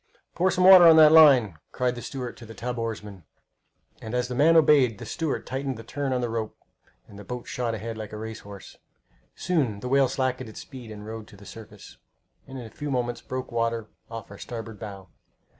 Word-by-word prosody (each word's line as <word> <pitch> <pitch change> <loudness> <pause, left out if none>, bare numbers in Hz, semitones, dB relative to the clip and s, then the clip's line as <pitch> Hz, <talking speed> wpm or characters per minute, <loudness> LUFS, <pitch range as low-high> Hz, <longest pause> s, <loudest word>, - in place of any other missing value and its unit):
"Pour 185 +2 +2
some 185 - 0
water 185 -2 +9
on 165 - +8
that 155 -1 +8
line!" 130 - +6
cried 125 -1 -1
the 120 - -8
steward 125 -3 -6
to - - -14
the 115 0 -11
tub 125 0 -4
oarsman. 105 -5 -6 0.8
And 110 +2 -5
as 125 0 -1
the - - -3
man 155 +6 +4
obeyed, 140 -8 +4
the - - -9
steward 160 -5 -3
tightened 135 -1 -4
the 115 - -9
turn 140 +4 -4
on 125 -1 0
the 120 - -2
rope, 110 -2 -4 0.5
and 100 - -13
the - - -9
boat 125 +3 -7
shot 120 -2 -2
ahead 110 +1 -6
like 110 -1 -7
a 105 - -7
race 110 +1 -7
horse. 100 -1 -12 0.6
Soon 135 - -1
the 125 - -6
whale 135 +1 +3
slackened 130 -1 -2
his 110 - -13
speed 125 -5 -10
and 105 -1 -9
rode 110 0 -8
to 100 - -16
the 100 - -15
surface, 105 -2 -12 0.5
and 135 0 -9
in 125 - -7
a 110 - -11
few 145 - -6
moments 120 -2 -2
broke 130 0 -6
water 115 -2 -2 0.2
off 115 -3 -8
our 100 - -11
starboard 115 -4 -8
bow. 100 -3 -9
120 Hz, 220 wpm, -25 LUFS, 110-135 Hz, 0.8 s, water